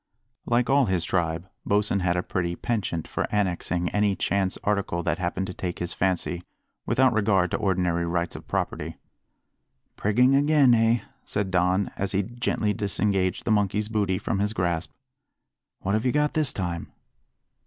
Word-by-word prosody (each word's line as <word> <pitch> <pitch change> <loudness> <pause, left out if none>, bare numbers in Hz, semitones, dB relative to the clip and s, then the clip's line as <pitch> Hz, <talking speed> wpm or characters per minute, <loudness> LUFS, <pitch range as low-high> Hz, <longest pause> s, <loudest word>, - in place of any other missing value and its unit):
Like 120 +1 +2
all 135 -2 +4
his 90 -3 0
tribe, 85 -1 -1 0.2
Bosin 100 0 +2
had 90 -1 +1
a 90 - 0
pretty 85 -2 -2
penchant 100 -9 -2
for - - -2
annexing 90 -3 0
any 105 -1 +1
chance 95 +1 0
article 100 -4 0
that - - -1
happened 90 +1 -1
to 90 - -6
take 90 -1 -4
his 90 - -3
fancy, 90 -1 0 0.5
without 130 -1 +3
regard 100 -5 +2
to - - +1
ordinary 90 -4 0
rights 85 0 -1
of - - -10
property. - - -3 1.0
"Prigging 125 +6 +3
again, 145 -2 +5
eh?" 115 0 +3 0.2
said 100 -2 -2
Don, 90 +2 +2
as 100 0 -1
he 100 +1 +2
gently 115 -1 -1
disengaged 100 -2 0
the 115 - +1
monkey's 105 0 +1
booty 100 -4 0
from 100 +2 -2
his 105 +1 0
grasp. 85 -5 -1 0.9
"What 100 - -1
have 110 +1 +1
you 125 - +2
got 150 +1 +1
this 155 -4 +1
time?" 85 -3 -4
100 Hz, 165 wpm, -26 LUFS, 90-110 Hz, 1.0 s, again